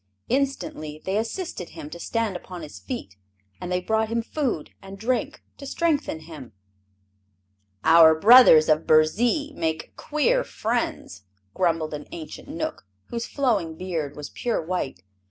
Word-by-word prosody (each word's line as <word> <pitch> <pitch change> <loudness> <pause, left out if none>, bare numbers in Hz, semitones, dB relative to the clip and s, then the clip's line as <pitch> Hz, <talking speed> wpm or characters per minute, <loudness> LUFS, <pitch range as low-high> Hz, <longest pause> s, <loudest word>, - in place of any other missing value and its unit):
Instantly 250 - -2
they 190 - -1
assisted 225 - -3
him - - -9
to 170 - -8
stand 225 0 -1
upon 180 -1 -8
his 150 - -9
feet, 100 - -7 0.4
and 180 - -6
they 180 - +1
brought 220 +4 0
him 230 0 -1
food 245 - -2
and 195 0 -10
drink 255 +7 -2
to 280 - -9
strengthen 295 - 0
him. 155 -8 -11 1.3
"Our 160 -1 +7
brothers 220 -7 +8
of 155 +1 +2
Burzee 235 - +3
make 160 - -3
queer 485 +13 +1
friends," 220 - -3 0.3
grumbled 165 -3 0
an 150 0 -6
ancient 160 -2 -8
Knook - - -5 0.2
whose 235 0 -4
flowing 215 - 0
beard 165 -6 -3
was 150 -1 -8
pure 240 -2 -1
white. 160 - -3
185 Hz, 140 wpm, -24 LUFS, 160-245 Hz, 1.3 s, brothers